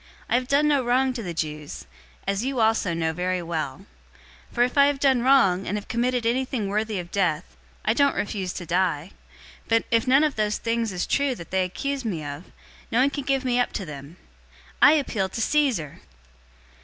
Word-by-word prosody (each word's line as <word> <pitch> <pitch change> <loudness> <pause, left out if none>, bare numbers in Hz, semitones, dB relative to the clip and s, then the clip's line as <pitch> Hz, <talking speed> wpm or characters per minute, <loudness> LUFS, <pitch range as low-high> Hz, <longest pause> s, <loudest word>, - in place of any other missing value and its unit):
I - - -2
have 250 +1 +1
done 285 +2 +3
no 285 -3 +2
wrong 255 +2 +2
to 245 - -5
the 180 -5 -5
Jews, 150 -2 -5 0.4
as 195 +2 -1
you 265 -1 -2
also 220 -4 +2
know 160 -1 -1
very 180 +1 -2
well. 160 -1 -4 0.6
025:011 - - -20
For 240 - +4
if 250 - -1
I 280 0 +6
have 285 -1 0
done 265 -3 +3
wrong, 235 -8 +4
and 205 - -1
have 205 - -7
committed 245 0 0
anything 245 -2 0
worthy 215 +1 -1
of 175 -1 -6
death, 180 -4 -1 0.3
I 215 - +3
don't 280 +3 +3
refuse 195 -3 -2
to 175 - -6
die; 175 -1 0 0.6
but 225 0 +3
if 230 +2 +2
none 270 +4 +5
of 300 -5 0
those 210 -1 0
things 230 -1 -1
is 180 -1 -2
true 280 -2 +1
that 170 - -11
they 190 0 +2
accuse 275 +9 -3
me 175 -10 -3
of, 145 +5 -7 0.4
no 230 - +1
one 275 +2 +3
can 285 -2 -5
give 270 -1 0
me 250 -1 +1
up 245 - 0
to 195 - -4
them. 145 +2 -10 0.6
I 295 - +8
appeal 225 -10 0
to 210 - -6
Caesar!" 235 - 0
225 Hz, 205 wpm, -24 LUFS, 180-260 Hz, 0.6 s, I